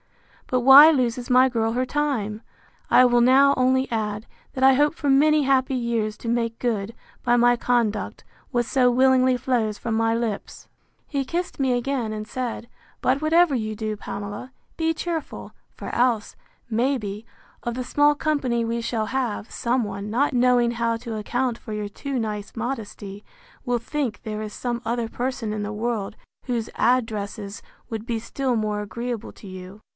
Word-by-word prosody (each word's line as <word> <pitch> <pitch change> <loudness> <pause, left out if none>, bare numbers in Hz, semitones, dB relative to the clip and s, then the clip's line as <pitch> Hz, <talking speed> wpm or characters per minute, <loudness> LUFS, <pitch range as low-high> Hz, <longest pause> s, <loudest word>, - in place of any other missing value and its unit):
—But 250 -1 +1
why 270 +5 +10
loses 250 -3 -1
my 255 +1 +6
girl 225 -3 0
her 255 +2 0
time? 250 -7 -2 0.5
I 255 - +7
will 240 -1 +4
now 270 +3 +6
only 260 +1 +2
add, 215 -1 -2 0.3
that 260 0 +2
I 270 - +7
hope 295 +4 +2
for 290 - -2
many 300 +2 +4
happy 265 -1 +2
years 230 -3 -1
to - - -9
make 230 -1 -1
good, 225 -3 -2 0.3
by 240 0 +3
my 245 0 +5
conduct, 235 -3 -1 0.2
what 240 -2 0
so 250 0 +3
willingly 260 0 +4
flows 230 -4 0
from 230 - -3
my 225 0 +2
lips. 230 -3 -4 0.4
He 280 -2 -1
kissed 345 +7 -3
me 265 -2 +1
again, 245 -3 -2
and 215 0 -5
said, 245 -2 -4 0.3
But, 260 +3 +1
whatever 320 -1 +4
you 215 -2 -2
do, 215 0 -3
Pamela, 205 +4 -7 0.2
be 325 0 0
cheerful; 325 -1 -5 0.2
for - - -7
else, 235 -3 +1 0.3
may 250 +5 +1
be, 210 -1 -6 0.4
of 240 -1 -3
the 255 - -3
small 290 +3 +3
company 275 -6 0
we 230 +1 -2
shall 225 -1 -1
have, 235 -2 -2
some 245 +1 0
one, 200 0 -5
not 265 +6 +1
knowing 245 -1 +3
how 230 -1 -1
to 230 -1 -6
account 245 +3 -2
for 220 - -9
your 210 -1 -3
too 265 +6 -4
nice 210 -2 -4
modesty, 210 -4 -5 0.4
will 245 -2 0
think 250 -2 -3
there 215 -1 -4
is 215 -1 -5
some 240 +1 -3
other 235 0 -1
person 240 -2 -3
in 215 - -3
the 205 - -4
world, 215 -2 -3 0.3
whose 235 -3 -2
addresses 215 -4 -1 0.3
would 225 -1 -5
be 235 -1 -2
still 245 +2 -2
more 210 -1 -1
agreeable 235 +2 -5
to 205 - -14
you. 185 +2 -10
240 Hz, 175 wpm, -24 LUFS, 215-260 Hz, 0.5 s, why